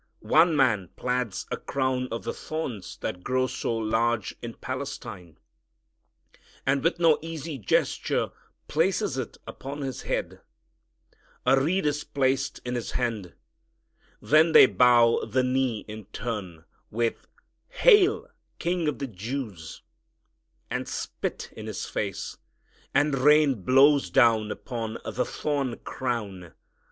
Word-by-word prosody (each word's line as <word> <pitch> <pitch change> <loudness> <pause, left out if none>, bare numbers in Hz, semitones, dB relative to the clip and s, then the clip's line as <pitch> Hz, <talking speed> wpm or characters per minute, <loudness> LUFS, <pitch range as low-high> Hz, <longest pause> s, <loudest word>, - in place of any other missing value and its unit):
One 165 +1 +6
man 110 - +2
plaits 125 -4 -2
a - - -1
crown 130 -1 -1
of 115 - -4
the - - -3
thorns 130 - -5
that 90 0 -4
grow 130 0 +1
so 120 -2 -2
large 115 0 0
in 120 -1 -6
Palestine, 115 - -6 1.3
and 135 +1 +1
with 165 +1 +2
no 165 -3 +5
easy 160 -3 -6
gesture 105 - 0 0.4
places - - +1
it - - -5
upon 140 +2 -7
His 135 -2 -4
head. - - -3 1.0
A 135 +1 +5
reed 180 +6 +1
is 150 0 0
placed 135 -1 0
in 125 - -2
His 120 -2 -3
hand. 110 -8 -2 0.8
Then 160 +2 +4
they - - +10
bow 120 -2 +4
the 130 +4 0
knee 125 -3 0
in 110 -1 -8
turn, 100 -7 -6 0.2
with 115 +1 -2 0.4
"Hail! 440 -4 +4 0.3
King 175 -1 -1
of 150 - -1
the 140 - -3
Jews," 110 - -6 0.9
and - - -2
spit - - -5
in - - -8
His - - -4
face, - - -4 0.5
and 140 -1 +2
rain 145 -4 +4
blows 135 +7 +5
down 115 -5 +4
upon 115 0 -5
the 125 - -1
thorn 140 -5 -2
crown. 105 -9 -4
130 Hz, 125 wpm, -26 LUFS, 115-140 Hz, 1.3 s, they